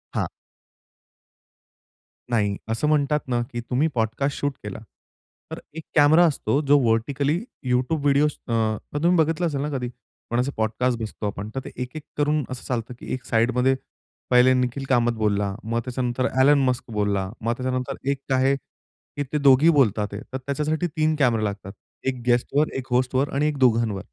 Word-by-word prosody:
हां. - - 0 2.0
नाही, 105 -4 +1
असं 115 +7 0
म्हणतात 150 0 +2
ना, 120 -1 0
की 120 - -4
तुम्ही 130 +6 0
पॉडकास्ट 120 +5 -1
शूट 145 -1 -1
केला, 105 0 -6 0.7
तर - - -5
1 160 -1 -7
कॅमेरा 155 +3 +6
असतो 145 -2 +1
जो 145 +1 +6
व्हर्टिकली 140 +8 +1 0.3
YouTube 130 +5 +1
व्हिडिओज 145 +1 +3 0.2
अ, 110 -2 +1 0.3
तुम्ही 175 +1 +4
बघितलं 165 +2 -1
असेल 140 -3 -2
ना 150 - -2
कधी 125 -1 -3 0.4
कोणाचे 125 +4 0
पॉडकास्ट 115 +2 0
बसतो 110 -1 -5
आपण 100 +1 -5
तर - - 0
ते - - -6
एक-एक 135 +4 -6
करून 150 0 +1
असं 130 -1 -6
चालतं 120 -1 -3
की - - -6
एक 130 - -4
साइडमध्ये 125 +3 +2 0.5
पहिले 125 +1 +6
निखिल 125 +2 -1
कामत 120 -2 +3
बोलला, 100 -2 0
मग 115 +1 -1
त्याच्यानंतर 125 0 -1 0.2
एलन 145 +1 +6
मस्क 125 - -1
बोलला, 100 -2 0
मग 115 +2 0
त्याच्यानंतर 130 -1 -2 0.2
एक 135 -1 -6
आहे 135 +1 +3
की 145 +1 -10
ते - - +2
दोघे 140 +3 +6
बोलतात 105 -6 +3
आहे 100 - -5
तर - - -1
त्याच्यासाठी 150 +5 -1
1 155 0 0
कॅमेरा 115 -5 +3
लागतात, 100 -2 -4 0.4
1 130 -2 -1
गेस्टवर, 125 +5 +2
1 130 0 -5
होस्टवर 130 +2 +1
आणि 150 +2 +2
1 150 -2 -2
दोघांवर. 115 -6 +2
130 Hz, 165 wpm, -24 LUFS, 115-145 Hz, 2.0 s, कॅमेरा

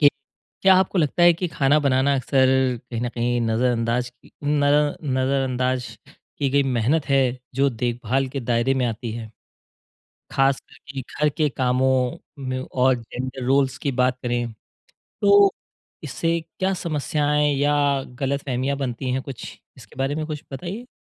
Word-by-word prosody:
कि 145 - +8 0.5
क्या 190 -1 +7
आपको 190 0 +1
लगता 160 +2 +1
है 175 0 +8
कि 175 +1 -3
खाना 145 0 +3
बनाना 140 0 +2
अक्सर 130 0 +2 0.4
कहीं 115 - -3
न 120 - -1
कहीं 120 0 -1
नज़रअंदाज़ 115 +1 0
की - - -23
न 145 0 +1
अ, 145 0 +3
नज़रअंदाज़ 130 -2 0 0.5
की 140 - +1
गई 140 +1 +3
मेहनत 135 +4 +1
है, 130 -2 +2 0.2
जो 140 +2 +3
देखभाल 120 +2 -1
के 135 +1 -4
दायरे 120 +2 +1
में 130 -1 +1
आती 115 0 -4
है? 110 -1 -7 1.0
खास 135 0 +2
करके 140 -1 -10
घर 150 +4 -1
के 150 +1 0
कामों 130 0 +1 0.3
में 130 0 -2
और 130 0 +2
जेन्ड़र 125 +2 -6
रोल्स 135 0 +2
की 140 - -2
बात 125 0 +1
करें, 120 -1 -1 0.5
तो 200 0 +4 0.5
इससे 165 +3 -1 0.2
क्या 190 +1 +1
समस्याएँ 150 -3 0
या 145 +1 +2 0.4
गलतफ़हमियाँ 135 0 -1
बनती 130 -1 -3
हैं 130 +1 -1
कुछ 135 -4 -8 0.3
इसके 115 -5 -16
बारे 135 +2 -1
में 155 0 -3
कुछ 150 -2 -6
बताइए? 185 - -6
135 Hz, 155 wpm, -23 LUFS, 125-145 Hz, 1.0 s, कि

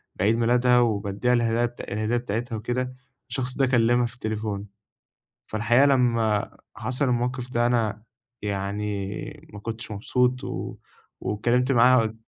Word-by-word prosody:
بعيد 105 +4 +2
ميلادها، 125 +1 +4
وبادِّيها 110 +1 +1
الهدايا 120 0 +2
بت 120 - -6
الهدية 110 +3 -1
بتاعتها 120 0 -3
وكده، 125 +3 -2 0.4
الشخص 125 +1 -2
ده 135 - +4
كلَّمها 120 -1 +3
في 115 - -5
التليفون. 110 -3 -3 0.8
فالحقيقة، 120 +5 +3
لمّا 115 -6 +2 0.2
حصل 130 +3 -1
الموقف 125 0 -1
ده، 120 0 +2
أنا 110 -3 0 0.4
يعني 105 +7 -4
ما 105 - -8
كنتش 115 +1 -6
مبسوط، 125 +5 +1
و - - -5 0.4
واتكلَّمت 125 +5 +1
معاها 125 +1 +6
قل 110 0 -2
120 Hz, 130 wpm, -25 LUFS, 110-125 Hz, 0.8 s, معاها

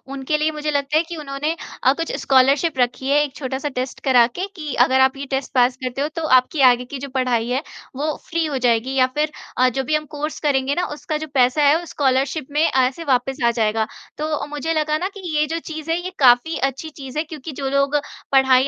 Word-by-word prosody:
उनके 275 +3 -1
लिए 310 +1 +1
मुझे 300 0 -3
लगता 285 +1 +1
है 325 - +3
कि 340 - -5
उन्होंने 295 +2 -3 0.3
अ, 260 - +5
कुछ 330 +2 -4
स्कॉलरशिप 275 +3 +3
रखी 245 +2 0
है, 295 +1 +4
एक 280 -2 -6
छोटा-सा 265 +1 -3
टेस्ट 255 0 -4
करा 250 -4 +5
के 365 +10 -5
कि, 305 -5 -5
अगर 260 +1 +4
आप 265 +1 +3
ये 280 - -5
टेस्ट 265 +1 -2
पास 250 0 +3
करते 255 +2 -3
हो 295 - +1
तो 330 - -3 0.2
आपकी 275 +3 -4
आगे 245 +1 -1
की 275 +2 -7
जो 280 0 -6
पढ़ाई 245 -2 +1
है, 265 +5 -1 0.3
वो 300 +2 -1
फ्री 330 -1 0
हो 285 -3 -2
जाएगी 245 +1 +1
या 255 -1 +4
फिर 305 0 0 0.3
अ, 255 0 +4
जो 265 +2 -2
भी 305 +3 0
हम 305 0 -1
कोर्स 300 +1 -4
करेंगे 280 -2 +1
ना 355 0 0
उसका 305 +1 -4
जो 315 +1 -6
पैसा 255 +3 +3
है 295 - +6
उस 345 - -10
स्कॉलरशिप 270 +1 0
में 300 +2 +1
ऐसे 260 +5 +1
वापस 265 -1 0
आ 235 - +4
जाएगा। 220 -1 0 0.3
तो 305 0 -2
मुझे 295 +2 -3
लगा 305 0 +1
ना 365 +3 -2
कि - - -9 0.2
ये 300 - +3
जो 330 +2 -2
चीज़ 315 +1 -5
है 335 - +2
ये 370 +1 -5
काफ़ी 255 +5 +4
अच्छी 290 +4 -8
चीज़ 275 -1 -9
है 310 - +1
क्योंकि 310 -1 -8
जो 270 -1 -1
लोग 275 +1 +1 0.4
पढ़ाई 265 0 +5
275 Hz, 240 wpm, -21 LUFS, 260-305 Hz, 0.4 s, है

